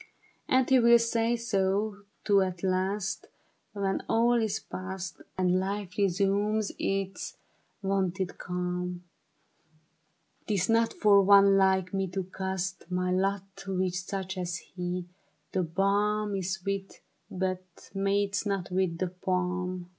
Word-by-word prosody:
And 260 0 +4
he 265 -1 +5
will 235 0 +7
say 230 0 +1
so, 205 -2 -1 0.2
too, 200 -2 +5
at 185 -1 -2
last 190 +2 -1 0.5
When 195 -2 -1
all 235 +1 +3
is 220 -1 0
passed 185 -3 -6 0.2
And 185 0 +3
life 195 -1 -3
resumes 200 +2 +1
its 195 0 -2 0.5
wonted 190 -1 -1
calm; 180 0 -3 0.7
' 160 +1 -42
Tis 200 -3 +1
not 230 0 +3
for 205 -2 +5
one 200 0 +7
like 190 -1 +3
me 195 0 0
to 190 +1 -3
cast 190 -1 -4
My 180 0 0
lot 195 +1 -1
with 185 -1 0
such 190 +1 -4
as 175 -1 -2
he; 180 0 -5 0.5
the 190 - +1
balm 200 +4 +1
Is 190 -1 -1
sweet, 195 +1 -4 0.3
but 185 -1 -4
mates 200 +1 +1
not 195 -4 -2
with 180 -2 0
the 185 +1 -1
palm. 180 0 -2
190 Hz, 130 wpm, -29 LUFS, 180-200 Hz, 0.7 s, will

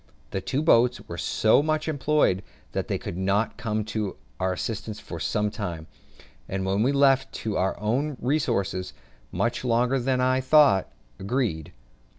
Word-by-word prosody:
The 95 - -2
two 135 +10 -1
boats 125 -6 +4
were - - -6
so 110 +5 +3
much 155 +1 -1
employed 145 -9 +2 0.3
that - - -3
they - - -1
could 85 - -6
not 100 +4 +1
come 110 -2 -2
to 105 -3 -2 0.2
our 95 0 +1
assistance 105 +2 -4
for - - -8
some 105 0 0
time, 85 -7 -5 0.6
and 95 0 -2
we 100 +7 +2
were 140 - -1
left 135 -1 +4
to 110 - -1
our 95 +1 0
own 130 +7 -1
resources 105 - -1 0.4
much 120 +1 -1
longer 125 +2 +2
than 130 +1 0
I 130 +1 +2
thought 135 -8 +4 0.3
agreeable. 100 - -1
115 Hz, 160 wpm, -26 LUFS, 95-135 Hz, 0.6 s, boats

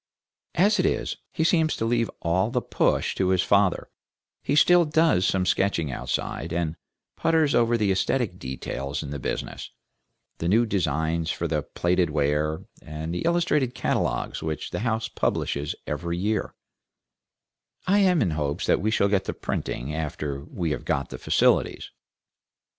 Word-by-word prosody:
As 205 +6 +3
it - - +3
is, - - -1
he 160 - -1
seems 160 -1 +3
to 115 - -2
leave 115 0 +1
all 90 +5 +1
the 125 +1 0
push - - 0
to 95 - 0
his 95 -1 +3
father; 100 -2 +2 0.5
he - - 0
still 175 +4 +6
does 155 - +3
some 95 -1 +1
sketching 90 -7 +1
outside, 80 +5 -3
and 85 -2 -1 0.4
putters 160 -3 +2
over 120 0 +3
the 105 -3 +1
aesthetic 95 - 0
details 65 +2 -4
in 70 - -7
the 70 - -4
business, - - -4 0.7
the 85 - -1
new 110 +6 +4
designs 80 -4 0
for - - -2
the - - 0
plated 90 0 0
ware, 75 +1 0 0.2
and 80 +2 -6
the 90 - -2
illustrated 150 -7 +1
catalogues - - -1
which 80 -1 -4
the - - -3
house 110 0 -1
publishes 70 +1 -1
every 85 0 -3
year; 105 +3 -1 1.3
I 200 +2 +3
am 180 - +4
in 90 - 0
hopes 75 -2 -2
that - - +2
we 105 - +1
shall 100 -2 +2
get 100 -1 +1
the - - -3
printing, 65 +5 -3
after 75 -3 -4
we 85 -2 -3
have - - -3
got 70 -1 -1
the - - -7
facilities. - - +2
95 Hz, 160 wpm, -25 LUFS, 80-120 Hz, 1.3 s, still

